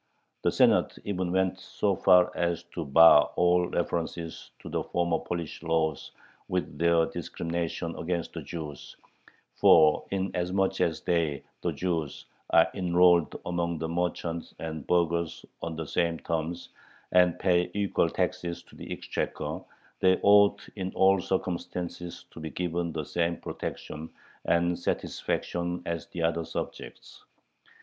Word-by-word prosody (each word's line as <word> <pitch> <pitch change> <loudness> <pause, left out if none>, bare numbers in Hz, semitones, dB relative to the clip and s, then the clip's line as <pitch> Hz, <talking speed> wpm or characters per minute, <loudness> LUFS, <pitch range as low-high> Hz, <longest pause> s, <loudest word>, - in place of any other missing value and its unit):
The - - +2
Senate - - +3
even 95 -3 -2
went 95 0 +1
so 100 +1 -1
far 90 0 +5
as 85 -1 -1
to 85 - -3
bar 75 +1 +7
all 90 0 +3
references 85 -1 -3
to - - -12
the - - -2
former 85 -1 0
Polish 85 -3 -5
laws 80 -2 0 0.4
with 90 -5 -3
their 85 -1 +4
discriminations 85 0 -4
against 85 -1 -3
the - - -5
Jews, 75 -5 -8 0.6
"for, 75 -2 +6
inasmuch 95 0 -1
as 80 -2 0
they 80 -5 0 0.2
[the - - 0
Jews] 85 -5 -3 0.2
are - - +6
enrolled 90 -2 +3
among 85 -1 -1
the 80 - -3
merchants 85 -1 -3
and 80 -3 -6
burghers 85 -1 0 0.2
on 85 -1 -4
the 80 0 -4
same 85 +2 0
terms, 85 +1 -3 0.4
and 90 -2 +4
pay 90 -1 +2
equal 100 -4 +1
taxes 90 -1 -2
to - - -19
the - - -9
exchequer, - - -3 0.4
they 95 0 +4
ought 100 0 +5
in 95 -2 -3
all 95 0 +4
circumstances 90 -1 -4
to - - -11
be 80 0 -5
given 85 0 -2
the 80 -1 -4
same 85 0 -1
protection 80 +1 -6 0.4
and 85 0 +2
satisfaction 85 0 -2
as 85 -1 -3
the 85 - -5
other 85 0 +1
subjects." - - -7
85 Hz, 135 wpm, -28 LUFS, 80-90 Hz, 0.6 s, bar